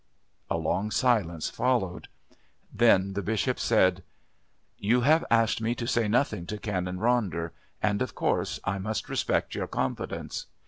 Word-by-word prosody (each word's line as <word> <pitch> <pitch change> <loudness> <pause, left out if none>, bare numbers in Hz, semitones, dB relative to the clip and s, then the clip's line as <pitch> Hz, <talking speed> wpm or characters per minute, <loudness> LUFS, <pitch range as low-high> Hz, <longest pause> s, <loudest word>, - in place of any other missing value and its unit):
A - - 0
long 90 +6 -1
silence 105 - +1
followed. 120 -8 0 0.7
Then 100 -5 +4
the 100 - -2
Bishop 110 +5 -1
said: 95 -5 +3 0.8
"You 115 +5 +2
have 155 +6 +4
asked 115 -1 +3
me 115 +2 0
to 120 - -4
say 120 -2 +1
nothing 105 -6 0
to 105 - -4
Canon 90 -3 -3
Ronder, 95 -8 0 0.3
and 105 -1 +1
of 125 - -2
course - - 0
I 95 0 -1
must 110 +3 -3
respect - - 0
your - - -3
confidence. - - -3
105 Hz, 145 wpm, -28 LUFS, 95-120 Hz, 0.8 s, Then